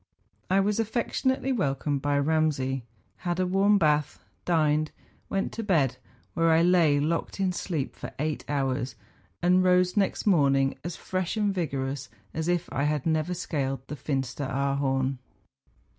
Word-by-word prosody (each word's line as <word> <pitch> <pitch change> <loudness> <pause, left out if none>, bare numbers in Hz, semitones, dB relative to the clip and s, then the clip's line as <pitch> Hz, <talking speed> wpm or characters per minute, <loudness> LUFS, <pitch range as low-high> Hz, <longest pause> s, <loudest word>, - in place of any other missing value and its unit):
I 190 +2 +4
was 210 +2 0
affectionately 255 +4 0
welcomed 145 - 0
by 145 0 +1
Kamsay, 140 -3 +1 0.4
had 175 0 -2
a 185 - +2
warm 195 +3 +4
bath, 150 - +2 0.3
dined, 155 -2 +2 0.4
went 195 0 -1
to 225 - -5
bed, 160 - +2 0.4
where 165 +6 +2
I 160 +1 +5
lay 170 -5 +4
locked 165 +6 -1
in 190 -2 +1
sleep 165 -6 -3
for - - -7
eight 155 +1 -2
hours, 135 -3 -1 0.5
and 180 +1 +4
rose 180 0 +3
next 200 -2 +1
morning 140 -8 +3
as 170 -1 -4
fresh 185 +2 -3
and 205 -2 +1
vigorous 135 -6 -3 0.2
as 160 +1 -2
if 175 -1 0
I 140 +2 0
had 150 -2 0
never 160 +2 0
scaled 135 -6 -2
the 150 - -4
Fin 135 0 -1
steraarhorn. 135 0 -1
155 Hz, 150 wpm, -27 LUFS, 140-180 Hz, 0.5 s, I